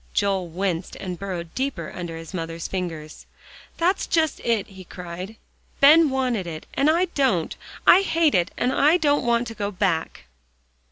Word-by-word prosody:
Joel 195 -3 +1
winced 180 0 -3
and 180 -3 -6
burrowed 175 -4 -5
deeper 260 - -3
under 170 -2 -5
his 165 +3 -10
mother's 165 -2 -4
fingers. 165 -5 -6 0.5
"That's 360 +3 +1
just 320 -3 +1
it," 230 -4 0
he 190 -1 -12
cried. 180 +3 -8 0.4
"Ben 305 +2 +7
wanted 250 -8 -1
it, 160 -2 -7
and 280 +2 +2
I 340 +4 +3
don't. 230 - +1 0.3
I 370 - +8
hate 330 -5 +2
it, 175 0 +2
and 250 +2 +1
I 305 +5 +4
don't 290 -4 +2
want 235 0 +2
to - - -7
go 205 -2 -3
back." 180 - -2
195 Hz, 165 wpm, -23 LUFS, 175-275 Hz, 0.5 s, I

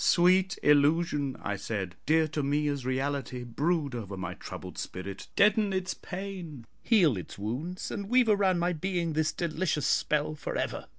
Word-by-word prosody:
"Sweet 185 +2 +4
illusion," 145 -1 +3
I 100 -1 -2
said, 95 -3 -4
"dear 160 +1 +4
to 150 0 -2
me 145 +2 +1
as 140 -3 -3
reality, 130 -1 -2
brood 145 +4 0
over 100 -5 -5
my 95 - -4
troubled - - -8
spirit, 95 +1 -6
deaden 210 0 +4
its 185 0 -1
pain, 180 - -7 0.2
heal 175 - +4
its 90 - -8
wounds, 130 - -4
and 200 0 -4
weave 250 0 +4
around 200 -4 +3
my 175 +1 +1
being 170 -1 -1
this 155 0 +1
delicious 160 -2 -1
spell 150 0 +1
for 155 - -5
ever." - - -3
155 Hz, 165 wpm, -29 LUFS, 130-185 Hz, 0.2 s, Sweet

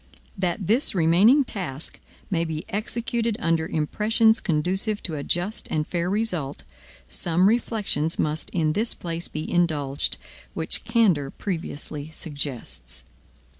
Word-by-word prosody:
That 185 0 -1
this 225 - +3
remaining 190 - +6
task 170 - -5 0.3
may 170 -3 +2
be 160 -1 -4
executed 230 +1 -1
under 165 -5 +1
impressions 220 +9 +3
conducive 190 +6 0
to 165 - -1
a 145 - -3
just 180 +8 -1
and 150 -1 0
fair 175 +1 -1
result, 185 -9 -1 0.4
some 175 +2 +2
reflections 205 -8 +1
must 155 +1 -1
in 155 -3 +1
this 225 +5 +2
place 170 0 -4
be 155 +1 -5
indulged, 150 -6 +1 0.4
which - - -1
candor 180 - +3
previously 155 -4 -4
suggests. 130 - -6
170 Hz, 125 wpm, -25 LUFS, 155-210 Hz, 0.4 s, remaining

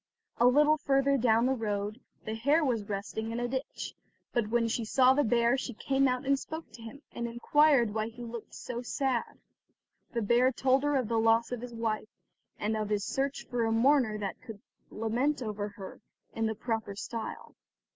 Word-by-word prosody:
A 240 - +6
little 300 +4 +5
further 275 -1 +2
down 230 -2 +3
the 265 - +2
road 210 -1 -3 0.2
the 220 - -3
hare 285 +8 +2
was 225 -6 -1
resting 210 +3 -4
in 230 - -3
a 245 - -1
ditch, 260 +2 -4 0.4
but 235 -3 +1
when 230 0 +2
she 230 +1 -1
saw 255 +3 +4
the 290 +2 +2
bear, 235 +2 +3
she 245 -3 -5
came 270 +4 +1
out 255 +1 -1
and 275 0 +2
spoke 315 +3 -7
to 235 - -13
him, 230 +6 -10
and 235 - -4
inquired 240 0 +3
why 215 0 -1
he 235 +2 -9
looked 235 -1 -8
so 240 -1 -5
sad. 255 -1 -2 0.7
The 235 -2 -1
bear 240 +4 +4
told 260 +2 +2
her 290 0 +1
of 255 -4 +1
the 230 0 +1
loss 225 +1 +3
of 245 -2 -3
his 245 -1 -8
wife, 220 -2 -2 0.5
and 215 +1 -1
of 215 -1 -2
his 205 -1 0
search 275 +1 -2
after 245 -1 -1
a 225 - +1
mourner 240 -1 +3
that 200 -2 -5
could 220 -3 -9 0.3
lament 245 +6 -1
over 210 -2 -3
her 195 +1 -9 0.3
in 225 0 0
the 220 - -2
proper 225 -3 -3
style. 225 +2 -6
235 Hz, 195 wpm, -30 LUFS, 220-265 Hz, 0.7 s, A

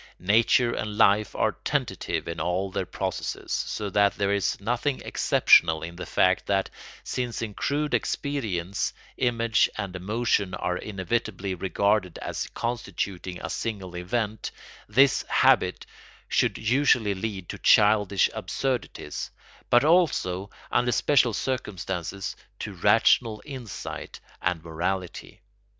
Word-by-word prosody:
Nature 115 +5 +3
and 105 -1 -4
life 105 -1 +4
are - - +2
tentative - - -2
in 85 0 -4
all 90 +4 -1
their - - -2
processes, - - -4
so 105 - -2
that 100 +1 +2
there 100 0 +1
is 100 -1 0
nothing 120 +6 -1
exceptional 80 -1 +4
in 85 +1 -6
the 90 - -7
fact 95 0 +2
that, 95 -1 0 0.3
since 120 -2 -3
in 110 -2 -5
crude 145 +7 -1
experience 100 - -1 0.2
image 115 -3 +2
and 100 -3 -4
emotion 100 0 0
are 90 0 -2
inevitably 100 0 -3
regarded 95 +1 0
as - - -4
constituting 100 -6 -3
a - - -4
single 95 -6 -4
event, 105 +4 -2 0.4
this 135 0 +4
habit - - +3 0.4
should - - +1
usually 120 -3 +2
lead 95 -2 -5
to - - -7
childish 105 -2 +4
absurdities, 130 -2 -3 0.4
but 120 - +5
also, 145 - +2 0.2
under 120 0 +2
special 125 0 +3
circumstances, 95 -6 -3 0.2
to - - -6
rational 110 -3 +3
insight 130 -7 -7 0.2
and 85 -3 -1
morality. 90 +3 -4
100 Hz, 120 wpm, -26 LUFS, 95-120 Hz, 0.4 s, but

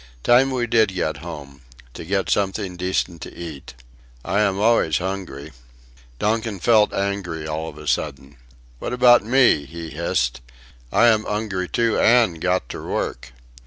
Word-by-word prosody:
"Time 125 +3 +5
we 125 -2 -1
did 110 -4 +2
get 80 -5 -1
home... 70 -3 -9 0.3
to - - -8
get 95 +1 -1
something 95 -2 -1
decent 90 -2 -2
to - - -9
eat... 80 -7 -9 0.5
I 100 +3 0
am 100 -2 +1
always 105 -8 +3
hungry." 85 -6 -5 0.7
Donkin 110 - -1
felt 110 +2 +4
angry 100 -5 -3
all 80 +1 -4
of 75 - -13
a 75 0 -10
sudden. 70 0 -3 0.4
"What - - -4
about 125 -2 +6
me," 120 - +3
he 85 +1 -8
hissed, 65 -6 -1 0.5
"I - - +4
am 110 -2 +3
'ungry 100 -4 -3
too 115 -1 +1
an' 115 -8 +4
got 90 -6 0
ter - - -7
work. - - -4
95 Hz, 155 wpm, -22 LUFS, 80-110 Hz, 0.7 s, about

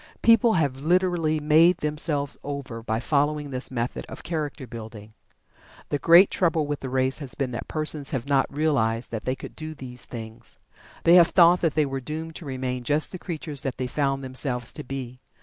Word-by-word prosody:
People 230 0 +6
have 145 -7 +1
literally 165 0 +1
"made 160 +4 +5
themselves 150 -2 -2
over" 140 -5 -5
by 110 0 -2
following 145 +2 0
this 130 0 -3
method 120 -1 -3
of - - -9
character 150 -4 -4
building. 110 -2 -10 0.8
The 145 - -1
great 170 +6 +7
trouble 165 -4 +1
with 145 0 -3
the 130 - -5
race 130 +2 0
has 135 -6 -3
been 135 -3 -2
that 120 - -5
persons 155 -2 -3
have 135 -4 -3
not 140 -1 +2
realized 135 -6 0
that 110 -2 -5
they 130 - 0
could - - -10
do 155 0 -6
these 125 -3 -8
things. 110 -2 -9 0.5
They 170 - +6
have 170 -2 +7
thought 175 0 +5
that 165 -4 +1
they 155 -2 +3
were 135 -1 -4
doomed 160 +4 -5
to 170 - -9
remain 130 -2 -3
just 150 +4 +1
the 185 - -3
creatures 155 -5 -4
that 135 -3 -3
they 130 - -2
found 135 +1 -1
themselves 130 -2 -3
to - - -7
be. 125 -1 -6
140 Hz, 195 wpm, -25 LUFS, 130-155 Hz, 0.8 s, great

